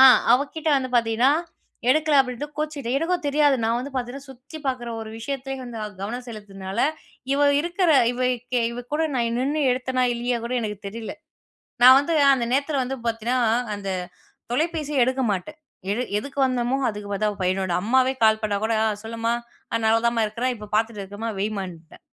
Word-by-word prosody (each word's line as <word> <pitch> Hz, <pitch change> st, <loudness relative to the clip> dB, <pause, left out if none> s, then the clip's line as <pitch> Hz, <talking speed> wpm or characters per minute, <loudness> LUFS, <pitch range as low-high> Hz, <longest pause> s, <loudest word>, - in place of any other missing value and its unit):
அ -, -, +10 dB, 0.3 s
அவகிட்டே 290 Hz, +4 st, +1 dB
வந்து 260 Hz, -1 st, -1 dB
பாத்தீங்கன்னா 235 Hz, +3 st, +3 dB, 0.6 s
எடுக்கல 310 Hz, +1 st, +3 dB
அப்படின்ட்டு 255 Hz, +2 st, -2 dB
கோச்சிக்கிட்டா. 300 Hz, -5 st, -3 dB
எனக்கும் 345 Hz, +2 st, -1 dB
தெரியாது, 290 Hz, 0 st, +4 dB
நான் 230 Hz, +1 st, +1 dB
வந்து 270 Hz, +3 st, -6 dB
பாத்தீங்கன்னா 260 Hz, +2 st, -4 dB
சுத்தி 265 Hz, +5 st, -11 dB
பாக்குற 255 Hz, -2 st, -2 dB
ஒரு 220 Hz, -1 st, -7 dB
விஷயத்தயே 270 Hz, +3 st, -4 dB
வந்து 240 Hz, -2 st, -7 dB
அ -, -, -3 dB
கவனம் 240 Hz, +5 st, -5 dB
செலுத்துனால, 195 Hz, -3 st, -6 dB, 0.5 s
இவ 285 Hz, +1 st, +3 dB
இருக்குற 345 Hz, +2 st, +1 dB, 0.2 s
இவ 245 Hz, -, -6 dB, 0.3 s
கெ 250 Hz, -, +3 dB
இவ 245 Hz, +1 st, -6 dB
கூட 320 Hz, +2 st, +1 dB
நான் 235 Hz, -2 st, 0 dB
நின்னு 290 Hz, +4 st, 0 dB
எடுத்தேனா 255 Hz, 0 st, 0 dB
இல்லையா 240 Hz, +1 st, -1 dB
கூட 240 Hz, +2 st, -2 dB
எனக்கு 210 Hz, -3 st, -4 dB
தெரில. 225 Hz, +2 st, -6 dB, 0.7 s
நான் 260 Hz, +1 st, +10 dB
வந்து 285 Hz, +4 st, -1 dB, 0.2 s
அந்த 250 Hz, -3 st, 0 dB
நேரத்துல 280 Hz, +1 st, +1 dB
வந்து 265 Hz, +2 st, -4 dB
பாத்தீங்கன்னா 230 Hz, +2 st, 0 dB, 0.4 s
அந்த 200 Hz, -1 st, -5 dB, 0.6 s
தொலைபேசிய 300 Hz, -1 st, +1 dB
எடுக்க 260 Hz, +1 st, 0 dB
மாட்டேன். 205 Hz, -, -4 dB, 0.3 s
எடு 220 Hz, +4 st, 0 dB, 0.2 s
எதுக்கு 280 Hz, +6 st, -5 dB
வந்தோமோ 250 Hz, 0 st, 0 dB
அதுக்கு 210 Hz, -1 st, -6 dB
பார்த்த, 210 Hz, +1 st, +1 dB
அவ 205 Hz, -, -10 dB
பையனோட, 185 Hz, 0 st, 0 dB
அம்மாவே 260 Hz, +4 st, +3 dB
கால் 220 Hz, 0 st, +4 dB
பண்ணா 210 Hz, -2 st, 0 dB
கூட 225 Hz, -, 0 dB
ஆ -, -, +3 dB, 0.2 s
சொல்லுமா, 230 Hz, +1 st, -2 dB, 0.4 s
அ -, -, +3 dB
நல்லா 225 Hz, +1 st, +4 dB
தான்மா 235 Hz, -1 st, +1 dB
இருக்குறேன், 240 Hz, +4 st, -1 dB
இப்ப 210 Hz, -1 st, -10 dB
பாத்துட்ருக்கேமா 215 Hz, -1 st, -2 dB
வைமான்ட்டேன். 190 Hz, -6 st, -5 dB
245 Hz, 170 wpm, -24 LUFS, 220-275 Hz, 0.7 s, அ